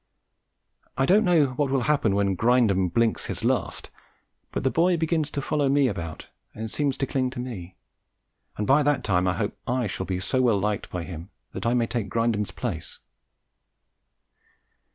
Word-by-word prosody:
I 135 - +3
don't 200 +8 +5
know 165 -8 +4
what 145 -2 +1
will 135 -1 +1
happen 125 -7 +2
when 100 -1 +1
Grindum 110 -4 +3
"blinks 115 +2 +1
his - - -4
last," - - -1 0.6
but - - -3
the 130 - +2
boy 175 +1 +3
begins 160 -2 0
to 140 -2 -4
follow 145 -2 +1
me 140 -1 +4
about 85 -8 -5 0.3
and 110 0 -5
seems 140 -3 0
to 135 - 0
cling 130 -1 0
to 125 - -8
me, 100 -8 -6 0.8
and 105 - -1
by 135 +5 +5
that 145 -3 +1
time 90 -2 +1
I 90 - +2
hope 105 -2 -2
I 125 0 0
shall 95 -2 -4
be 90 -1 -1
so 130 +7 0
well 120 -5 +3
liked 105 +1 -2
by 90 -2 -4
him 85 +1 -8 0.2
that - - -3
I 120 - +2
may 120 -1 +2
take 115 -4 -3
Grindum's 110 -2 0
place. 85 -1 -5
120 Hz, 180 wpm, -25 LUFS, 100-140 Hz, 0.8 s, don't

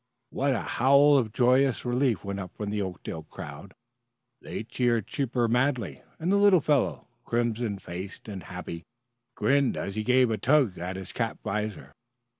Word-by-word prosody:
What 135 0 +1
a - - -1
howl 140 +3 +5
of 115 -4 -2
joyous 130 +3 +3
relief 120 -6 +1
went 100 0 -3
up 90 -2 -7
from 105 -1 -3
the 105 0 -1
Oakdale 95 -3 -5
crowd! - - -10 0.7
They - - -5
cheered 120 -1 0
Chipper 120 -1 -1
madly, 120 - 0 0.2
and 170 +4 -1
the 200 - +4
little 200 -3 +6
fellow, 145 -3 +1 0.2
crimson 115 -3 -1
faced 95 +3 -8
and 100 -3 -6
happy, 90 -2 -7 0.5
grinned 140 -1 +2
as 100 - -3
he 110 +1 -2
gave 125 0 +4
a 110 - -1
tug 130 -4 +3
at 90 +2 -4
his 95 -1 -7
cap 115 -2 -2
visor. 105 0 -4
115 Hz, 165 wpm, -27 LUFS, 100-130 Hz, 0.7 s, little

